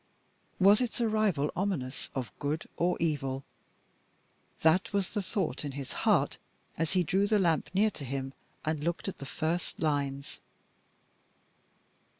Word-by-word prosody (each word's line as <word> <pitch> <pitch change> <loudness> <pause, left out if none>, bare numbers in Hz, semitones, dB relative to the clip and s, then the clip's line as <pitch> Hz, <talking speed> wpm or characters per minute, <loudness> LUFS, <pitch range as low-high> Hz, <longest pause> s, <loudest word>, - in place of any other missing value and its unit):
Was 200 +4 +7
its 245 -1 -1
arrival 215 -10 +2
ominous 175 -10 -2
of 130 -3 -3
good 150 +2 -2
or 175 +1 +1
evil? 135 -5 -1 1.2
That 160 +4 +4
was 200 -2 0
the 210 - 0
thought 190 -5 -1
in 145 -2 -4
his 135 -1 -5 0.2
heart - - +3 0.4
as 165 +1 0
he 185 -1 +3
drew 190 +5 +2
the 215 0 +4
lamp 170 -5 +2
near 210 +4 +3
to 150 - -8
him, 135 0 -3 0.3
and 155 -1 -1
looked 170 +4 -1
at 195 - -4
the 140 - -6
first 165 +4 -2
lines. 145 -2 -1
160 Hz, 145 wpm, -30 LUFS, 140-195 Hz, 1.2 s, Was